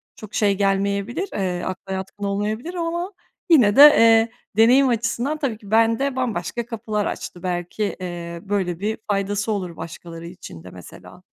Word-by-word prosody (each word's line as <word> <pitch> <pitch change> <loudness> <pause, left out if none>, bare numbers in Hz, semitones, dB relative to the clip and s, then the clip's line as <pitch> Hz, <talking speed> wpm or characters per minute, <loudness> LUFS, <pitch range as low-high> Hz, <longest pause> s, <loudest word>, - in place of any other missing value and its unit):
çok 215 -1 -12
şey 200 -2 +2
gelmeyebilir, 200 - 0
eee, 180 -3 -2
akla 190 +1 -5
yatkın 195 +2 -6
olmayabilir 215 - -2
ama, 345 +2 -3 0.4
yine 235 -11 +5
de, 280 - +8
eee, 230 -6 +7 0.3
deneyim 255 +4 +6
açısından, 240 +5 -1
tabii 265 -8 -2
ki, 205 -1 -14
bende 230 +5 +2
bambaşka 235 -3 -2
kapılar 215 -2 -3
açtı, 175 - -6
belki, 180 +3 -3 0.2
eee, 170 -1 -6
böyle 190 -4 -2
bir 215 +3 -2
faydası 205 +2 -1
olur 185 -5 -4
başkaları 170 0 -8
için 170 - -11
de, 90 - -10
mesela. 90 -2 -13
205 Hz, 155 wpm, -22 LUFS, 185-235 Hz, 0.4 s, de